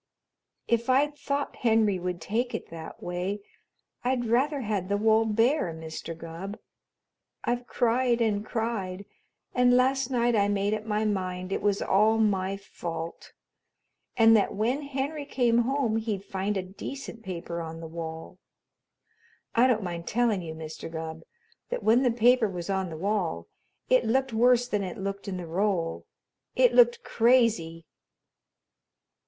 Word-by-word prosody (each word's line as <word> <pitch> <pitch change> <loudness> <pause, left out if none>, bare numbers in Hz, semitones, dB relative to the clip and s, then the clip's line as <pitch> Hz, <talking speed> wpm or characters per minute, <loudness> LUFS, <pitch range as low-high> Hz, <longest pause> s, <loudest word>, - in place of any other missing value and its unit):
"If 235 +1 +1
I'd 285 +3 +3
thought 285 -1 -3
Henry 220 -5 +2
would 180 0 -3
take 230 +8 -2
it - - -6
that 160 -1 -9
way, 180 +3 -3 0.6
I'd 250 -1 0
rather 270 +5 +1
had 205 -5 -2
the 200 - +2
wall 220 +1 +4
bare, 225 - +2
Mr. 160 0 -7
Gubb. 170 +5 -7 0.9
I've 245 0 -1
cried 240 0 +2
and 210 -3 +1
cried, 205 -4 -3 0.5
and 250 0 +4
last 265 0 +2
night 240 -2 +2
I 200 -1 +3
made 205 0 0
up 215 0 -3
my 215 0 0
mind 185 -2 -2
it - - -1
was 200 -1 +1
all 215 +3 +3
my 195 -3 +1
fault 170 -4 -7 0.8
and 225 -1 +7
that 210 - +2
when 240 +8 0
Henry 285 +2 -3
came 240 -4 +2
home 245 -2 +1
he'd 215 -3 -2
find 195 +2 -2
a 190 - -1
decent 225 +6 -8
paper 170 -4 -5
on 165 0 -7
the 165 - -7
wall. 160 +2 -7 1.1
I 240 +2 +5
don't 225 -5 +1
mind 170 -2 -5
telling 230 -4 +1
you, 160 -2 -6
Mr. 160 0 -7
Gubb, 160 0 -5 0.5
that - - -3
when 230 +3 +5
the 255 - +3
paper 240 -1 +4
was 180 0 -4
on 190 -2 -1
the 160 - -7
wall 180 - -1 0.4
it 255 -1 +4
looked 260 +2 +1
worse 245 +2 +4
than 210 -4 -1
it 180 -2 -5
looked 195 +1 -4
in 190 -2 -3
the 180 - -5
roll. 175 -1 -1 0.5
It - - +4
looked 480 0 +5
crazy." 225 -9 +2
215 Hz, 155 wpm, -27 LUFS, 185-245 Hz, 1.1 s, and